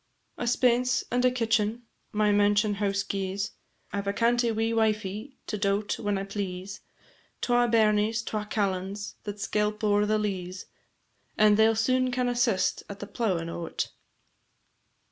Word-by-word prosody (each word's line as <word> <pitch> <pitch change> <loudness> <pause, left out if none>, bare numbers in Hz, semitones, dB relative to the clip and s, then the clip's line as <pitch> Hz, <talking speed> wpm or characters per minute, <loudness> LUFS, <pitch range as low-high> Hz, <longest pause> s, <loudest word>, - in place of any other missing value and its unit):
A 240 - -2
spence 250 +1 +2
and 245 +1 +1
a - - +6
kitchen 230 -1 0 0.3
my 210 0 +2
mansionhouse 205 -1 +2
gies, 195 +1 -2 0.4
I 200 - 0
've 200 - -10
a 200 - +1
cantie 235 +1 +2
wee 225 +1 0
wifie 215 +3 -1
to 210 - -4
daut 200 +1 0
whan 205 -3 0
I 195 - -2
please, 195 -1 -5 0.6
Twa 245 0 +3
bairnies, 220 0 +3
twa 210 -1 -3
callans, 200 -1 -2
that 205 -1 -4
skelp 210 +2 -1
o'er 205 0 +3
the 215 0 +2
leas, 185 -3 -3 0.7
And 210 -1 +6
they 220 +1 +5
'll 225 - +1
soon 255 +3 +2
can 250 0 0
assist 240 -6 +1
at 200 0 -7
the - - -5
plowin' 190 -7 -1
o't. 170 0 -4
210 Hz, 150 wpm, -27 LUFS, 200-230 Hz, 0.7 s, a